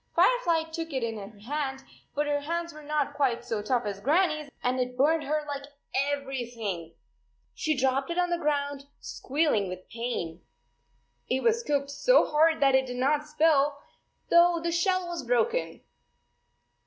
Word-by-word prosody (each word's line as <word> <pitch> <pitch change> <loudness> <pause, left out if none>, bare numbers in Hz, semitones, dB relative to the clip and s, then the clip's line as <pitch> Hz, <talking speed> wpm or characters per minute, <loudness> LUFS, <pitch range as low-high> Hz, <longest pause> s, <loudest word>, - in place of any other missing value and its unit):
Firefly 345 -11 +3
took 330 -1 -5
it 260 -2 -1
in 225 -1 -2
her 205 +1 -10
hand, 270 +2 -3 0.3
but 295 +1 +1
her 290 0 0
hands 335 +3 -3
were 305 - -11
not 295 -1 -1
quite 250 -5 0
so 220 -3 -2
tough 245 +2 0
as 200 -1 -4
Grannie 310 - +2
s - - -18
and 255 +1 +1
it 250 0 -2
burned 310 +4 +3
her 305 +2 0
like 285 -1 -4 0.3
21 275 +2 +1
everything! 235 - -4 0.6
She 310 -3 -1
dropped 265 +2 +1
it 340 - -3
on 355 0 +1
the 345 - 0
ground, 285 -2 -1
squealing 275 -8 0
with 185 0 -8
pain. 225 -8 -4 0.9
It 260 +1 0
was 460 0 +3
cooked 280 -7 -1
so - - +4
hard 320 +2 +3
that 275 -1 +5
it 265 0 +3
did 250 0 -5
not 295 +4 +1
spill, 300 -2 +3 0.5
though 340 0 +6
the 335 +1 -2
shell 370 +1 +1
was 345 0 -4
broken. 485 0 0
285 Hz, 170 wpm, -28 LUFS, 255-325 Hz, 0.9 s, though